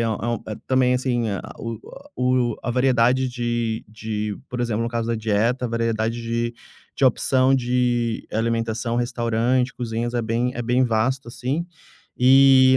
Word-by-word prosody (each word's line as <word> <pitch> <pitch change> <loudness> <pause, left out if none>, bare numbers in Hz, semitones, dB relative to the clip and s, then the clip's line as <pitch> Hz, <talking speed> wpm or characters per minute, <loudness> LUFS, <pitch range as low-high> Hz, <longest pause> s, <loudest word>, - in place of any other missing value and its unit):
é 115 - +1
um 115 +1 -2 0.3
também, 130 -1 +3
assim, 125 -3 0
a 100 - -2 0.2
o 115 -2 -5 0.4
o 125 -2 +1
a 120 - -2
variedade 130 0 +3
de 120 -2 -2
de, 105 -1 -4
por 125 0 -3
exemplo, 115 -2 0
no 115 - -1
caso 115 -1 -2
da 115 - +1
dieta, 110 +3 0
a 120 - 0
variedade 115 0 -1
de 115 +1 -2 0.4
de 135 - +1
opção 130 +1 +3
de 120 -2 0
alimentação, 115 +1 -1
restaurante, 120 +1 0
cozinhas 120 0 -3
é 120 - +1
bem 115 +3 0
é 120 - -4
bem 125 +2 +2
vasto, 120 +3 0
assim. 130 +8 -3 0.5
E 130 0 +7
120 Hz, 155 wpm, -23 LUFS, 115-125 Hz, 0.5 s, E